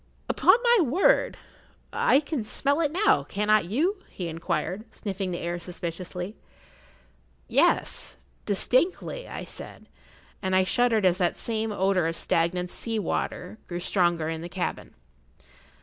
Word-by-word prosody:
Upon - - +5
my 475 -1 +5
word—I 465 - +1
can 290 -5 -3
smell 280 +8 0
it 300 -3 +1
now, 380 +6 +3
cannot 210 -1 +2
you?" 310 - 0
he 175 -3 -5
inquired, 180 +5 -3
sniffing 195 -2 -4
the 175 - -3
air 175 0 -3
suspiciously. 180 +2 -6 1.1
"Yes—distinctly," 260 - 0
I - - -6
said, - - -10 0.6
and 190 -1 0
I 190 - +5
shuddered 225 +1 +2
as 180 0 +3
that 175 -2 +1
same 220 -1 -2
odour 190 -3 +2
of 165 - -2
stagnant 175 +2 0
sea 225 -1 -3
water 195 +1 -3
grew 175 -1 -4
stronger 175 -3 +1
in 160 0 -3
the 170 - -6
cabin. 180 0 -4
195 Hz, 130 wpm, -26 LUFS, 175-255 Hz, 1.1 s, Upon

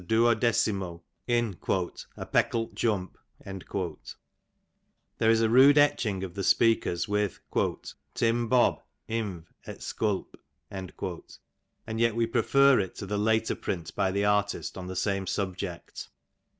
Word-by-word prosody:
duodecimo 110 -5 +1 0.2
in 120 -5 +1 0.6
"a - - -5
pecklt 115 -1 0
jump.^^ 95 -4 -4 1.0
There 110 - +3
is 115 0 +4
a 115 - +4
rude 135 +5 +7
etching 120 -10 +2
of 90 -3 -6
the 100 - -4
speakers, 110 -5 +2
with 105 -1 -1 0.4
" - - -14
Tim 115 0 +1
Bob. 125 +1 +3 0.3
inv. 105 -7 -3 0.2
et - - -8
sculp. 105 -3 -2 0.3
;^' 95 -2 -7 0.5
and 110 - -3
yet 115 -1 +2
we 115 0 +2
prefer 135 +4 +4
it 95 -3 -3
to - - -6
the 100 +1 -2
later 110 +1 +2
print 80 -3 -4
by 100 -2 +1
the 100 +2 0
artist 105 0 0
on 95 -1 -7
the 95 - -6
same 100 0 -1
subject. 95 -3 -4
105 Hz, 135 wpm, -28 LUFS, 95-115 Hz, 1.0 s, rude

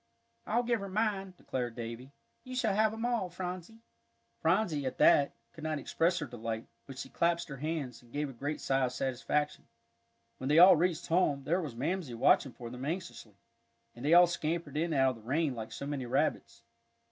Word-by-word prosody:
"I'll 235 +2 +2
give 235 -1 +1
her 200 0 -6
mine," 195 -2 -1
declared 120 -6 -4
Davie. 120 +3 -7 0.3
"You 255 -1 -7
shall 225 -5 +1
have 215 +1 +3
'em 225 +1 -4
all, 235 -7 0
Phronsie." 180 +5 -6 0.6
Phronsie, 165 -5 +1
at 130 - -4
that, 140 -1 +5 0.2
could 160 -2 -11
not 155 -1 -1
express 165 +5 +1
her 150 - -2
delight, 115 -3 -5 0.2
but 135 -1 -9
she 135 - -5
clasped 170 +3 0
her 135 - -6
hands, 145 -5 -4
and 120 -1 -21
gave 145 +2 -2
a 135 - -8
great 145 +5 -4
sigh 135 -1 +2
of 125 - -3
satisfaction. 135 +4 -1 0.7
When 130 - -4
they 150 - +4
all 180 +2 +10
reached 170 0 0
home, 155 -5 +2
there 175 +6 +1
was 145 -8 -6
Mamsie 150 0 -2
watching 125 +2 +3
for 120 -1 -8
them 125 +1 -7
anxiously. 155 - -5 0.6
And 120 - -11
they 155 +4 +5
all 175 0 +9
scampered 170 -3 -3
in 165 +2 0
out 135 -3 +3
of - - -7
the - - -15
rain 155 0 +1
like 115 -2 -6
so - - -6
many 140 -3 -3
rabbits. 135 -2 -1
150 Hz, 200 wpm, -31 LUFS, 130-180 Hz, 0.7 s, all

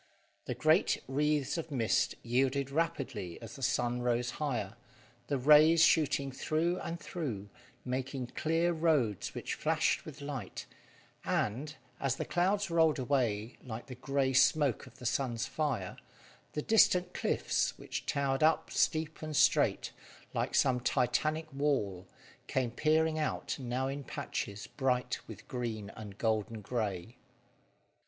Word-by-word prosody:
The - - -3
great - - +3
wreaths 145 +2 +1
of 165 - -6
mist 120 -6 +1
yielded 135 +3 +1
rapidly 135 - -2
as 115 +4 -9
the 135 - -10
sun 120 -1 0
rose 120 0 0
higher, 120 -8 -2 0.5
the 140 - 0
rays 155 +5 +7
shooting 140 -4 +3
through 165 +6 0
and 170 0 -5
through, 125 - -5 0.4
making 130 0 -3
clear 165 +2 +1
roads 150 - +1
which - - -3
flashed - - +1
with 155 -1 -10
light, 140 -9 -6 0.6
and, 140 +9 -1 0.2
as 135 -3 0
the - - -3
clouds 195 +2 +1
rolled 160 -2 +4
away 120 -5 0
like 120 -2 -6
the 130 - -8
grey 135 +1 0
smoke 140 -1 +3
of 130 - -16
the 125 - -10
sun's 120 -1 0
fire, 130 -12 -2 0.6
the 150 - -2
distant 200 -5 +4
cliffs, - - 0
which - - -6
towered 140 -1 0
up 155 0 +3
steep 155 0 0
and 155 -1 -4
straight, 140 0 +3 0.4
like - - -1
some 125 -1 +3
titanic 145 +6 0
wall, 105 -11 -1 0.4
came 125 -3 0
peering 155 +3 +2
out 155 - -2
now 130 +1 -2
in 140 +1 -4
patches 100 -4 -4
bright 125 -2 -1
with 110 0 -11
green 110 -5 -4
and 105 -2 -10
golden 110 0 -1
grey. 105 -1 -3
135 Hz, 135 wpm, -32 LUFS, 120-155 Hz, 0.6 s, rays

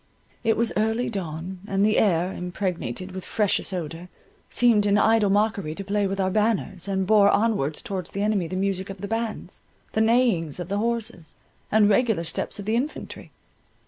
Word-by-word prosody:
It 225 - +2
was 230 0 +1
early 220 +3 0
dawn, 180 -1 -5
and 195 0 +2
the 215 0 +3
air, 180 -3 +2
impregnated 180 - -4
with 185 0 -6
freshest 210 -3 0
odour, 170 0 -5 0.4
seemed 225 -4 +3
in 200 0 +4
idle 220 -1 +4
mockery 200 -5 +1
to 195 - -6
play 200 0 0
with 195 +1 -3
our 190 -1 +1
banners, 210 -3 0
and 190 -1 0
bore 205 0 +5
onwards 200 -10 +1
towards 190 -3 -4
the 200 - -3
enemy 205 -5 +1
the 185 - -5
music 190 0 -1
of 195 -1 -8
the 200 - -4
bands, 225 0 -4 0.3
the 220 - +1
neighings 220 - +2
of 175 0 -5
the 200 +1 0
horses, 220 -9 -3 0.4
and 215 -1 +5
regular 210 -3 +2
step 165 - -3
of 200 - -7
the 220 +2 +1
infantry. 270 +6 -4
200 Hz, 180 wpm, -25 LUFS, 185-220 Hz, 0.4 s, bore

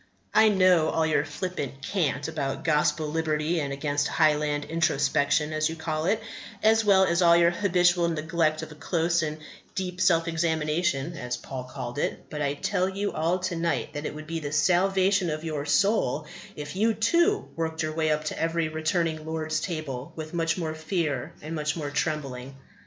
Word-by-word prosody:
I 220 0 +6
know 185 -5 +4
all 160 - +1
your 155 -2 +2
flippant 145 -3 -5
cant 145 -6 -1
about 150 -4 -3
gospel 150 0 +2
liberty 160 +1 0
and 140 -2 -2
against 145 +1 -1
Highland 150 -2 +2
introspection, 150 -1 +1
as 155 0 +1
you 165 - -5
call 160 -1 -3
it 210 +3 +2 0.4
as 220 +1 +5
well 195 -2 +5
as 170 -1 +2
all 170 -1 +6
your 170 0 +5
habitual 175 -2 +2
neglect 160 -1 0
of - - -8
a - - -8
close 170 +2 0
and 155 -1 -3 0.4
deep 185 -1 -3
self 170 -2 +3
examination, 160 -1 0
as 125 -5 -4
Paul 130 -1 -7
called 125 0 -6
it; - - -3
but 150 - -4
I 140 0 0
tell 180 +5 0
you 200 +1 -2
all 165 +3 0
to 185 -1 -2
night 165 -2 -1
that 150 0 -4
it - - -6
would 155 0 -8
be 165 +1 -3
the 145 -2 -5
salvation 190 +3 +3
of 155 0 -3
your 150 -3 -3
soul 155 - +2 0.3
if 145 +2 -7
you 220 +3 +2
too 340 - +2
worked 160 0 -2
your 155 0 -2
way 160 0 0
up 150 0 +1
to 155 - -4
every 165 -1 0
returning 160 0 -1
Lord's 155 0 -2
table 155 -6 -5
with 155 +1 -7
much 165 0 0
more 160 -3 -2
fear 155 -2 -2
and 155 +2 -5
much 150 -1 -1
more 150 -4 -4
trembling. 140 -4 -3
160 Hz, 185 wpm, -26 LUFS, 150-175 Hz, 0.4 s, I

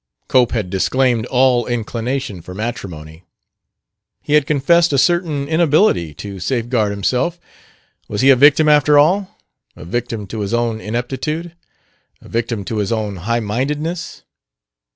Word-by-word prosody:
Cope 125 -2 +3
had 105 -7 -2
disclaimed 115 +5 +1
all 125 -2 +2
inclination 120 -2 -3
for 90 +2 -10
matrimony. 90 -8 -6 1.0
He 150 - -2
had 150 -2 +4
confessed 165 +4 +3
a 140 - +1
certain 160 -2 +1
inability 155 - +2
to 100 +4 -8
safeguard 115 +1 0
himself. 125 - -1 0.7
Was 105 - -3
he 135 +1 +6
a - - +6
victim, 145 +4 +5
after 150 0 +5
all? 185 +7 +2 0.4
A - - -11
victim 115 +2 -3
to 110 +3 -7
his 105 +2 -1
own 115 -2 -1
ineptitude? 135 +9 -4 0.7
A - - -16
victim 115 -3 -3
to 110 - -4
his 105 -1 -1
own 105 -3 -2
highmindedness? 130 - -3
120 Hz, 135 wpm, -18 LUFS, 105-145 Hz, 1.0 s, he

